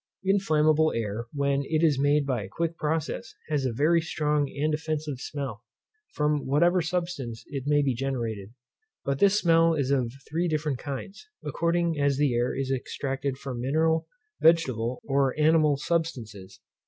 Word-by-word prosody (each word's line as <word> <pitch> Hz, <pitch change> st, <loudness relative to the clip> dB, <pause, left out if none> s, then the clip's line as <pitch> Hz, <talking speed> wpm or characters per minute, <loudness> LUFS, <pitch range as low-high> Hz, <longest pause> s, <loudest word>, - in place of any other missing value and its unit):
Inflammable 155 Hz, -5 st, +3 dB
air, 115 Hz, +1 st, -3 dB
when 140 Hz, -1 st, 0 dB
it 155 Hz, +3 st, 0 dB
is 150 Hz, -5 st, +3 dB
made 145 Hz, 0 st, +3 dB
by 130 Hz, -5 st, -1 dB
a 95 Hz, -, -8 dB
quick 165 Hz, +7 st, -2 dB
process, 160 Hz, +9 st, -3 dB
has 145 Hz, -3 st, 0 dB
a 130 Hz, -, 0 dB
very 155 Hz, +8 st, +3 dB
strong 150 Hz, -3 st, 0 dB
and 150 Hz, +2 st, -1 dB
offensive 155 Hz, -3 st, -3 dB
smell, 135 Hz, -6 st, -5 dB, 0.5 s
from 150 Hz, -2 st, 0 dB
whatever 170 Hz, +6 st, +3 dB
substance 170 Hz, -9 st, -3 dB
it 140 Hz, -1 st, -5 dB
be 145 Hz, -2 st, +3 dB
generated; 115 Hz, -6 st, -3 dB, 0.5 s
but 140 Hz, 0 st, -1 dB
this 200 Hz, +1 st, +5 dB
smell 165 Hz, -3 st, +4 dB
is 140 Hz, -3 st, 0 dB
of 125 Hz, -4 st, +1 dB, 0.2 s
three 170 Hz, +3 st, -1 dB
different 150 Hz, -4 st, -1 dB
kinds, 170 Hz, -, -7 dB, 0.2 s
according 170 Hz, -1 st, 0 dB
as 140 Hz, -1 st, +2 dB
the 145 Hz, -3 st, +2 dB
air 120 Hz, +1 st, 0 dB
is 135 Hz, 0 st, -2 dB
extracted 135 Hz, +1 st, -3 dB
from 130 Hz, -3 st, -5 dB
mineral, 160 Hz, +5 st, +1 dB, 0.3 s
vegetable, 130 Hz, -8 st, +3 dB
or 140 Hz, 0 st, +1 dB
animal 155 Hz, -2 st, +4 dB
substances. 115 Hz, -, -3 dB
145 Hz, 155 wpm, -27 LUFS, 130-160 Hz, 0.5 s, this